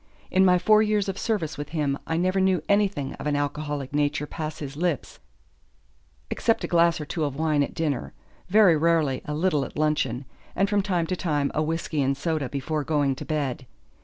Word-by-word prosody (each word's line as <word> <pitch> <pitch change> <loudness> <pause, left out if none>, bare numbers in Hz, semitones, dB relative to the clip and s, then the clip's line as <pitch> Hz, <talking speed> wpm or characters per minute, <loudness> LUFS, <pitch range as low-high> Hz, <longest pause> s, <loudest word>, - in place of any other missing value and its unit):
In 190 - +4
my 180 -1 +5
four 215 +4 +5
years 210 -2 +1
of 195 0 -3
service 160 -10 -2
with 145 - -5
him 145 -3 0
I 160 - 0
never 185 +2 +1
knew 190 -4 +2
anything 200 -9 +1
of - - -4
an 145 - +1
alcoholic 145 -1 -3
nature 145 0 0
pass 155 0 -5
his 140 -2 -6
lips 165 -4 -2 1.1
except 225 - +1
a - - -1
glass 170 -1 +3
or 150 - -5
two 160 +2 -3
of 140 -2 -2
wine 155 -1 +1
at 140 - -2
dinner, 150 -5 -2 0.3
very 200 -3 +6
rarely 155 -4 +2
a 150 - -3
little 155 -3 +1
at - - -8
luncheon, 145 -4 0 0.3
and 195 +2 +2
from 205 0 +2
time 180 -4 0
to 185 - -2
time 150 -6 -1
a 155 - 0
whisky 155 -1 -1
and 135 0 +1
soda 155 -4 -1
before 145 +3 -2
going 145 -2 +1
to - - -7
bed. 140 -5 -2
155 Hz, 200 wpm, -25 LUFS, 145-180 Hz, 1.1 s, very